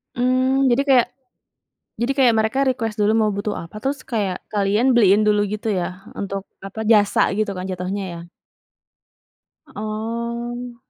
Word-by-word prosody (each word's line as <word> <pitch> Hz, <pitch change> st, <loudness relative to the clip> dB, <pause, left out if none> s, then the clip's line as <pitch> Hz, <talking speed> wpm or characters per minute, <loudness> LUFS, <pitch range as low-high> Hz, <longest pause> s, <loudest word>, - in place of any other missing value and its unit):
Mmm, 255 Hz, +1 st, +2 dB
jadi 245 Hz, -, +3 dB
kayak 250 Hz, -2 st, +5 dB, 0.9 s
jadi 235 Hz, +3 st, +1 dB
kayak, 255 Hz, -4 st, +5 dB
mereka 220 Hz, +5 st, 0 dB
request 235 Hz, -4 st, -1 dB
dulu 210 Hz, 0 st, +2 dB
mau 220 Hz, -1 st, +3 dB
butuh 205 Hz, +1 st, -2 dB
apa, 170 Hz, +4 st, -8 dB
terus 275 Hz, +1 st, -1 dB
kayak 205 Hz, -7 st, -2 dB
kalian 210 Hz, +5 st, +2 dB
beliin 205 Hz, -2 st, +5 dB
dulu 210 Hz, 0 st, +3 dB
gitu 210 Hz, +2 st, -3 dB
ya, 185 Hz, -1 st, -2 dB, 0.2 s
untuk 195 Hz, 0 st, -3 dB, 0.2 s
apa, 195 Hz, +3 st, -8 dB
jasa 205 Hz, -3 st, +4 dB
gitu 215 Hz, -2 st, 0 dB
kan 185 Hz, 0 st, -5 dB
jatuhnya 185 Hz, +2 st, -3 dB
ya? -, -, -8 dB, 1.5 s
Oh. 235 Hz, +3 st, -4 dB
220 Hz, 145 wpm, -21 LUFS, 200-240 Hz, 1.5 s, kayak